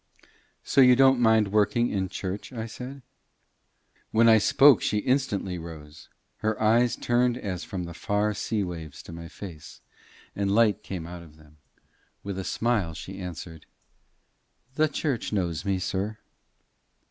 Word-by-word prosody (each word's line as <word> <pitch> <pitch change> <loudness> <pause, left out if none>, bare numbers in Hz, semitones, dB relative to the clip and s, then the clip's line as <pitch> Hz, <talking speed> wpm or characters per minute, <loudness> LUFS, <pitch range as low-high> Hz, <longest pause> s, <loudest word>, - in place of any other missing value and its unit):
"So 140 - +3
you 125 -1 +7
don't 135 0 +5
mind 110 -3 +4
working 120 +4 +2
in 95 -2 -1
church?" 95 +6 -5
I 115 -3 -5
said. 125 +4 -9 1.1
When 115 +1 +4
I 110 -1 +7
spoke 135 +4 +6
she 105 - 0
instantly 105 -7 -1
rose, 80 -2 -11 0.3
her 110 0 -2
eyes 115 +3 +3
turned 120 0 +1
as 95 -7 -4
from 95 -3 -5
the 85 0 -7
far 105 +4 0
sea 105 0 -2
waves 80 -5 -7
to - - -11
my 85 0 -8
face, 85 -2 -10 0.6
and 100 0 0
light 110 -2 +3
came 90 -5 -6
out 85 0 -8
of 80 -3 -15
them. 75 0 -20 0.7
With 100 -1 -4
a - - -3
smile 105 -7 -1
she 95 +4 -8
answered 85 -3 -8 1.1
"The 155 +3 +2
church 140 -5 -2
knows 90 -4 -2
me, 100 -1 +1
sir." 100 +4 -3
100 Hz, 150 wpm, -26 LUFS, 90-115 Hz, 1.1 s, you